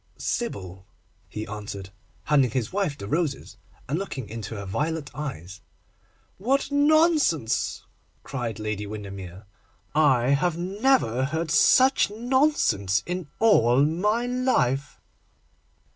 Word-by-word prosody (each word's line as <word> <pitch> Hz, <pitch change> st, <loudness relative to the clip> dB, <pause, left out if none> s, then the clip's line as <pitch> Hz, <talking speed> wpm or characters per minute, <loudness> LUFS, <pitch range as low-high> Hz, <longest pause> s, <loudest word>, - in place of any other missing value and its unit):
'Sybil,' 95 Hz, -, -4 dB, 0.4 s
he 105 Hz, 0 st, -5 dB
answered, 100 Hz, -2 st, -7 dB, 0.3 s
handing 140 Hz, -4 st, +3 dB
his 120 Hz, +2 st, -3 dB
wife 190 Hz, -8 st, -1 dB
the 100 Hz, -, -7 dB
roses, 150 Hz, 0 st, -2 dB, 0.3 s
and 150 Hz, +6 st, -1 dB
looking 135 Hz, -, -5 dB
into 110 Hz, +1 st, -6 dB
her 100 Hz, -1 st, -6 dB
violet 150 Hz, +9 st, -3 dB
eyes. 95 Hz, -, -7 dB, 0.8 s
'What 270 Hz, +8 st, 0 dB
nonsense!' 290 Hz, -, +2 dB, 0.4 s
cried 120 Hz, -4 st, -4 dB
Lady 105 Hz, -1 st, -4 dB
Windermere. 100 Hz, -2 st, -8 dB, 0.5 s
'I 140 Hz, +2 st, +3 dB
never 190 Hz, -, +1 dB
heard 160 Hz, +3 st, -2 dB
such 260 Hz, -, +5 dB
nonsense 225 Hz, -, +1 dB
in 180 Hz, -2 st, -4 dB
all 140 Hz, -, +4 dB
my 210 Hz, +9 st, 0 dB
life. 245 Hz, -, 0 dB
140 Hz, 105 wpm, -25 LUFS, -, 0.8 s, such